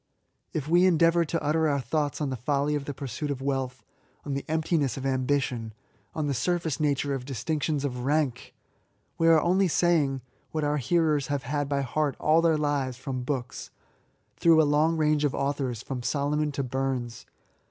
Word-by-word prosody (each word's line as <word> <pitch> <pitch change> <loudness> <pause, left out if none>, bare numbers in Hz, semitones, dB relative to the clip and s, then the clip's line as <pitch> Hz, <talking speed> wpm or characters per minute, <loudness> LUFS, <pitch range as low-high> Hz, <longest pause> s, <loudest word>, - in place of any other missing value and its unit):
If 150 -2 -3
we 175 +3 +5
endeavour 170 -1 +4
to 165 +1 -2
utter 155 +2 +2
our 140 -1 +1
thoughts 145 +3 -1
on 140 -3 -1
the - - -2
folly 140 +4 0
of 145 -2 -2
the 145 - -4
pursuit 140 +3 -4
of 140 -2 -2
wealth, 135 -1 -2 0.4
on 145 - -3
the 140 - -2
emptiness 155 -5 0
of 135 - -5
ambition,, 130 -4 -1 0.4
on 155 - -1
the 145 - 0
sur 175 +8 +1
face 160 -5 -3
nature 145 -2 0
of 135 -2 -3
distinctions 145 +3 -2
of 125 -3 -3
rank, 140 -3 +1
&c. - - -15 0.7
we 165 - +3
are 165 -1 +7
only 185 +4 +2
saying 155 -6 +2 0.3
what 155 -1 -2
our 150 0 +1
hearers 150 -1 +1
have 145 -2 -2
had 145 +2 -2
by 140 -1 0
heart 140 +2 -1
all 155 +2 +4
their 165 -2 +3
lives^ 145 -4 -1
from 130 0 -5
books,— 125 -2 -4 0.7
through 165 -1 +5
a - - +6
long 155 +3 +2
range 150 -1 +2
of 145 - +1
authors, 135 -4 -2
from 130 -2 -5
Solomon 145 +3 0
to 140 - -2
Burns. 130 -2 -3
145 Hz, 190 wpm, -27 LUFS, 135-155 Hz, 0.7 s, are